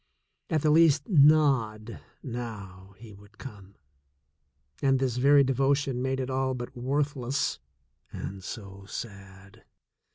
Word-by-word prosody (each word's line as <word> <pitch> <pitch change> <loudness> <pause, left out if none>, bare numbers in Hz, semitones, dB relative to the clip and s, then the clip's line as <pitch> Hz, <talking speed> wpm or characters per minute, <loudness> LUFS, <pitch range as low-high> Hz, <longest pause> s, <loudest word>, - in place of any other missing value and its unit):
At 155 -2 0
the 155 - +3
least 155 -2 +4
nod 140 - +3 0.2
now 100 -6 -8
he 110 0 -13
would 100 +2 -18
come, 100 -6 -11 1.1
and 135 -1 +3
this 130 -2 -1
very 140 +2 +5
devotion 135 0 0
made 130 0 -1
it 130 0 -3
all 130 0 -1
but 120 +2 -7
worthless, 135 +1 -2 0.5
and 95 0 -7
so 100 0 -9
sad. 95 -3 -10
125 Hz, 120 wpm, -27 LUFS, 105-140 Hz, 1.1 s, very